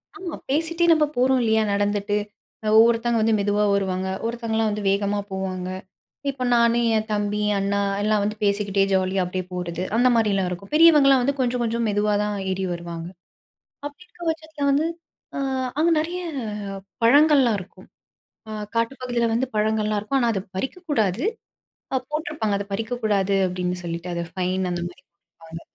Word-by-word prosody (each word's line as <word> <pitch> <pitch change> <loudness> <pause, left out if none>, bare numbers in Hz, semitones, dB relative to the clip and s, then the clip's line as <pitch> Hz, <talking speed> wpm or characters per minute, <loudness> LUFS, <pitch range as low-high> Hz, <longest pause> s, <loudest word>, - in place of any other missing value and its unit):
ஆமா, 370 -5 -6
பேசிட்டே 330 +4 +1
நம்ப 310 -1 +3
போறோம் 260 +1 +3
இல்லையா 220 0 +3
நடந்துட்டு. 205 0 0 0.5
அ - - -1
ஒவ்வொருத்தங்க 230 0 +4
வந்து 225 0 +3
மெதுவா 205 +1 +1
வருவாங்க, 190 -1 -1 0.2
ஒருத்தங்கள்லாம் 225 -1 -1
வந்து 210 0 -3
வேகமா 200 +1 0
போவாங்க. 185 -1 -3 0.6
இப்ப 265 -2 -4
நானு, 235 0 +4 0.2
என் 215 0 -2
தம்பி, 205 0 -1 0.2
அண்ணா 200 +1 0 0.2
எல்லாம் 215 -1 +2
வந்து 210 +1 -1
பேசிக்கிட்டே 200 -1 +1
ஜாலியா 190 0 +1
அப்படியே 185 0 -4
போறது. 175 -1 -4 0.2
அந்த 245 +2 +4
மாரியல்லாம் 200 -4 +2
இருக்கும். 180 +5 -7
பெரியவங்கல்லாம் 295 -5 +6
வந்து 280 +2 0
கொஞ்சம் 250 -1 0
கொஞ்சம் 230 0 -1
மெதுவா 210 0 +1
தான் 210 0 -2 0.2
ஏறி 190 0 -2
வருவாங்க. 170 -1 -6 0.8
அப்படி 290 +4 -8
இருக்க 350 - -21
பட்சத்துல 315 -2 -4
வந்து 300 +4 +2 0.5
அ - - -2 0.4
அங்க 330 - +4
நெறைய 345 +3 -3 0.8
பழங்கள்லாம் 275 -3 +5
இருக்கும். 185 +2 -13 0.6
ஆ - - -6 0.2
காட்டுப்பகுதியில 240 0 0
வந்து 260 +3 +1
பழங்கள்லாம் 215 0 +1
இருக்கும். 270 +7 -1
ஆனா, 235 - +2
அத 195 - -1 0.2
பறிக்கக்கூடாது. 260 - -1 0.7
அ - - +4
போட்டிருப்பாங்க, 300 -9 -2
"அத 200 - -4
பறிக்கக்கூடாது." 215 -3 0
அப்படீன்னு 180 0 -2
சொல்லிட்டு. 170 +1 -5
அத 170 - -2
ஃபைன், 185 0 -1
அந்த 175 - -2
மாரி 175 - -17
போட்டிருப்பாங்க. 165 -1 -14
215 Hz, 150 wpm, -23 LUFS, 195-255 Hz, 0.8 s, பெரியவங்கல்லாம்